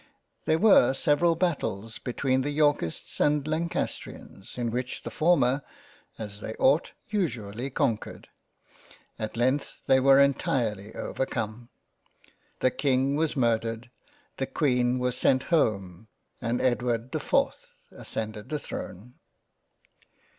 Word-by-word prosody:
There 160 - +3
were 160 - +5
several 160 +5 +3
Battles 115 - -2
be 125 - -4
tween 130 0 +1
the 140 - -2
Yorkists 145 - 0
and 150 0 +2
Lancastrians, 155 - -4
in 120 -2 -1
which 125 +2 -4
the - - -6
former 145 -5 +3 0.6
(as 105 -2 -7
they 110 - -6
ought) 145 +5 +2 0.2
usually 125 - -2
conquered. 115 -4 -2 0.9
At 110 +1 -4
length 130 +4 0
they 130 - +5
were 135 +1 +6
entirely 115 -7 +1
overcome; 120 -2 -3 0.9
The 130 - +3
King 135 0 +1
was 155 +1 0
murdered 115 -1 0 0.2
— 290 0 -35
The 135 - -2
Queen 125 -4 +1
was 125 -1 0
sent 130 +1 +2
home 100 - 0 0.2
— - - -44
and 120 0 -1
Edward 120 -1 0
the - - -1
4th - - 0 0.2
ascended 110 +1 -6
the 150 - -1
Throne. 120 -4 -8
125 Hz, 125 wpm, -27 LUFS, 115-145 Hz, 0.9 s, were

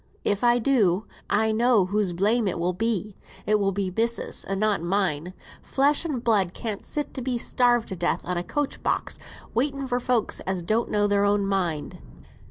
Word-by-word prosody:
"If 205 +2 0
I 240 0 +5
do, 220 -6 +2 0.2
I 220 0 +2
know 230 -2 +3
whose 200 0 0
blame 210 +6 +1
it 185 - -1
will 175 +2 0
be. 210 0 -2 0.3
It 215 0 +2
will 195 -1 +1
be 195 -1 -2
missis's, 230 +1 +1
and 195 0 -3
not 215 -4 +1
mine. 180 -2 -1 0.3
Flesh 285 +4 +2
and 270 -7 -3
blood 200 -7 +2
can't 215 -4 -5
sit 295 -1 -3
to 265 - -5
be 250 0 -1
starved 240 0 +2
to 190 - -4
death 175 0 -1
on 180 - -2
a 175 - -2
coach 290 +7 -3
box, - - -1 0.3
waiting 275 +3 0
for 245 -1 -1
folks 245 -3 0
as 190 -2 -3
don't 220 +6 0
know 205 -1 +2
their 205 0 +2
own 205 0 +2
mind." 180 -6 -2
210 Hz, 190 wpm, -25 LUFS, 190-240 Hz, 0.3 s, I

